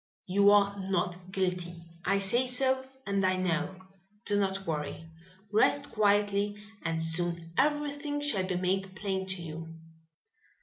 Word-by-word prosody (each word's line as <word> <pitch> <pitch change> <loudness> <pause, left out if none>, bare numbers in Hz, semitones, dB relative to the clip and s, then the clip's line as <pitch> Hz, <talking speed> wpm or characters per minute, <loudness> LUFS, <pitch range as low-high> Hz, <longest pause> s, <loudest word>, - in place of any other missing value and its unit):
"You 200 +2 +4
are 200 -1 +4
not 185 -1 -1
guilty. 180 -2 -1 0.3
I 195 +2 +2
say 215 +6 +1
so, 260 +1 +1 0.2
and 200 -1 0
I 185 0 +3
know. 185 +1 -1 0.5
Do 205 0 +2
not 195 0 -1
worry. 155 0 -3 0.5
Rest 220 +6 +3
quietly, 205 -1 +2 0.2
and 160 0 -1
soon 170 0 +1
everything 290 0 0
shall 220 -11 0
be 185 - -1
made 190 +1 -1
plain 190 -1 -2
to 190 -2 +2
you." 165 0 -7
195 Hz, 135 wpm, -30 LUFS, 180-205 Hz, 0.5 s, You